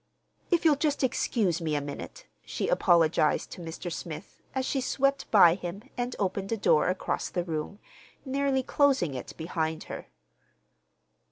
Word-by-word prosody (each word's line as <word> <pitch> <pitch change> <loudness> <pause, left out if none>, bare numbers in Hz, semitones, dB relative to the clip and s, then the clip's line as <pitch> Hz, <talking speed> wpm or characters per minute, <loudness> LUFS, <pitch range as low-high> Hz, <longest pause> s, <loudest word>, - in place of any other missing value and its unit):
"If 345 -2 +2
you'll 300 -3 +5
just 290 -1 0
excuse 205 -8 +1
me 155 -2 -1
a - - +2
minute," 145 - -7 0.2
she - - -3
apologized 170 - +3
to - - -8
Mr. 170 +1 -6
Smith, 160 -3 -8
as 260 -1 0
she 270 - 0
swept 275 +2 0
by 180 -6 +7
him 180 +2 -6
and 245 0 -2
opened 195 +1 -2
a 225 - +1
door 180 -6 +3
across 185 - -2
the 175 - -2
room, 165 +3 -4 0.5
nearly 270 0 +1
closing 270 - +2
it 125 - -7
behind 160 -1 -2
her. - - -7
195 Hz, 155 wpm, -28 LUFS, 165-265 Hz, 0.5 s, by